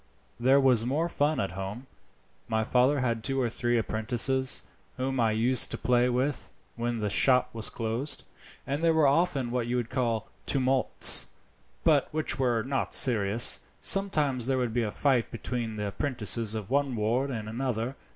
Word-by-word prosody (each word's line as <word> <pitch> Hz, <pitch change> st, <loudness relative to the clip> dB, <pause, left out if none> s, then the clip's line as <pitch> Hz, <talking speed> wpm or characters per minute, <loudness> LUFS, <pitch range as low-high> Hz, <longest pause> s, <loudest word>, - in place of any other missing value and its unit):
There 130 Hz, +3 st, +4 dB
was 130 Hz, -4 st, +3 dB
more 145 Hz, +8 st, -1 dB
fun 150 Hz, -2 st, -1 dB
at 95 Hz, -, -2 dB
home. 95 Hz, +7 st, -7 dB, 0.6 s
My 110 Hz, -1 st, 0 dB
father 130 Hz, +4 st, +2 dB
had 115 Hz, -3 st, -2 dB
two 135 Hz, -1 st, 0 dB
or 125 Hz, -2 st, 0 dB
three 120 Hz, +1 st, -1 dB
apprentices, 120 Hz, +4 st, 0 dB, 0.3 s
whom 130 Hz, 0 st, -2 dB
I 115 Hz, -2 st, +2 dB
used 115 Hz, +4 st, +2 dB
to -, -, -3 dB
play 125 Hz, 0 st, +1 dB
with 130 Hz, +3 st, -2 dB, 0.2 s
when 120 Hz, -1 st, -3 dB
the 105 Hz, -, -1 dB
shop 125 Hz, +2 st, +3 dB
was 110 Hz, -1 st, +1 dB
closed, 115 Hz, +5 st, -3 dB, 0.4 s
and 140 Hz, +4 st, -3 dB
there 165 Hz, -1 st, +3 dB
were 160 Hz, -2 st, +3 dB
often 140 Hz, -4 st, +1 dB
what 120 Hz, -1 st, -2 dB
you 120 Hz, -, -2 dB
would 120 Hz, -2 st, -3 dB
call 115 Hz, -4 st, -1 dB, 0.2 s
tumults, 130 Hz, -1 st, +3 dB, 0.6 s
but -, -, +2 dB
which 155 Hz, -2 st, -3 dB
were 120 Hz, -4 st, +1 dB
not 135 Hz, -2 st, -2 dB
serious. 115 Hz, -2 st, +5 dB, 0.2 s
Sometimes 150 Hz, -11 st, +1 dB
there 135 Hz, -1 st, 0 dB
would 125 Hz, -3 st, -2 dB
be 120 Hz, -, 0 dB
a 110 Hz, -, -2 dB
fight 130 Hz, +1 st, 0 dB
between 115 Hz, -1 st, -5 dB
the 105 Hz, -1 st, -3 dB
apprentices 115 Hz, -, -2 dB
of 105 Hz, -1 st, -6 dB
one 140 Hz, -2 st, 0 dB
ward 115 Hz, +6 st, -1 dB
and 110 Hz, -5 st, -5 dB
another. 120 Hz, +1 st, -3 dB
125 Hz, 170 wpm, -27 LUFS, 115-135 Hz, 0.6 s, serious